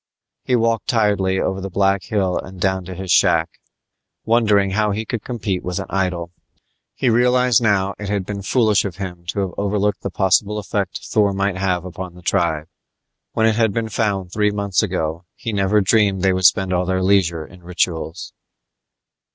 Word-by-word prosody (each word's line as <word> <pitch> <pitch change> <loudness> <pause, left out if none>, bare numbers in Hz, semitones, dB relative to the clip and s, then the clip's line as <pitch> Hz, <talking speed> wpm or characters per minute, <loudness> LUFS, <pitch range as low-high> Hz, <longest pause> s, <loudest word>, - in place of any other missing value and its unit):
He 125 - +1
walked 115 -1 +1
tiredly 100 -5 +1
over 95 0 -1
the 95 - -4
black 95 +1 +1
hill 95 -4 0
and 95 +1 -6
down 95 0 0
to 95 +1 -7
his 95 0 -4
shack, 85 -1 +3 0.7
wondering 105 -4 +3
how 105 +2 +1
he 105 +2 -2
could 115 -1 -4
compete 105 -7 -3
with 90 -1 -3
an 95 - -3
idol. 90 -3 -1 0.6
He 130 - -1
realized 125 0 +3
now, 100 -3 +2
it 105 -1 -5
had 100 -2 -1
been 100 0 -5
foolish 110 0 +2
of 95 -4 -4
him 90 -3 -7
to 100 - -2
have 95 -2 -3
overlooked 100 0 0
the - - -3
possible 100 +3 +1
effect 100 -2 -3
Thor 105 -2 +2
might 100 -1 -1
have 90 -2 -1
upon 90 0 -7
the 90 - -14
tribe. 80 -3 0 0.7
When 110 - +2
it 110 -1 +2
had 110 -3 +2
been 115 0 -2
found 100 -4 -1
three 105 +1 +2
months 100 -2 0
ago, 85 -4 -2
he 115 - -5
never 100 +1 +2
dreamed 100 -1 +2
they 95 -1 +4
would 95 0 -1
spend 95 +1 +4
all 90 0 0
their 95 0 0
leisure 90 -5 +2
in 90 +2 -16
rituals. 85 -1 -3
95 Hz, 185 wpm, -20 LUFS, 90-105 Hz, 0.7 s, they